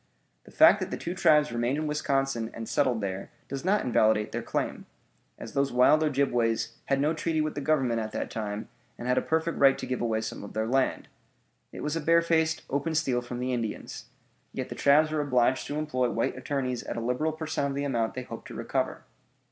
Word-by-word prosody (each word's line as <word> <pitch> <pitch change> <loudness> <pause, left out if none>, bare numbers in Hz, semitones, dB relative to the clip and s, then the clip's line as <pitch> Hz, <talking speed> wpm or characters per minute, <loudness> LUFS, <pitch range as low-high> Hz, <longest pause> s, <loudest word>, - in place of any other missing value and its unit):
The - - -15
fact - - +6
that - - -3
the - - -4
two 175 - -4
tribes 150 -4 +4
remained 120 +4 0
in 155 - -2
Wisconsin 135 -5 0
and 115 -1 -6
settled 130 -6 +1
there 95 -1 -4 0.2
does 135 0 -5
not 200 +4 +2
invalidate 110 -3 +2
their - - -3
claim, - - -3 0.5
as - - -9
those 140 0 +1
wild 125 +5 +5
Ojibways 120 -6 +1
had 135 0 +1
no 150 +3 +2
treaty 160 0 -1
with 155 0 0
the 145 - -4
Government 135 -6 +1
at 110 -1 -4
that - - -4
time 105 -1 -4 0.3
and 120 - -6
had 125 0 +3
a - - -3
perfect 160 +1 -1
right 135 -1 +6
to - - -5
give 125 - -3
away 110 -2 0
some 110 - -6
of 100 - -9
their 110 0 -1
land. 130 +3 0 0.6
It - - -8
was 150 +1 -1
a 165 - -1
barefaced, 165 0 +2
open 145 +4 -1
steal 130 -6 +1
from 120 0 -6
the 125 +1 -1
Indians. 115 -3 -4 0.5
Yet - - -4
the - - -4
tribes 150 +2 +4
were 155 -1 0
obliged 130 -2 +1
to 145 - -3
employ 130 -5 0
white 115 - -1
attorneys 130 -2 -2
at - - -6
a - - -1
liberal 125 +7 0
per 160 0 -6
cent. 145 -2 -1
of 140 - -3
the 140 - -1
amount 120 -5 -1
they 130 - -4
hoped - - -9
to - - -9
recover. - - -2
135 Hz, 220 wpm, -28 LUFS, 120-150 Hz, 0.6 s, fact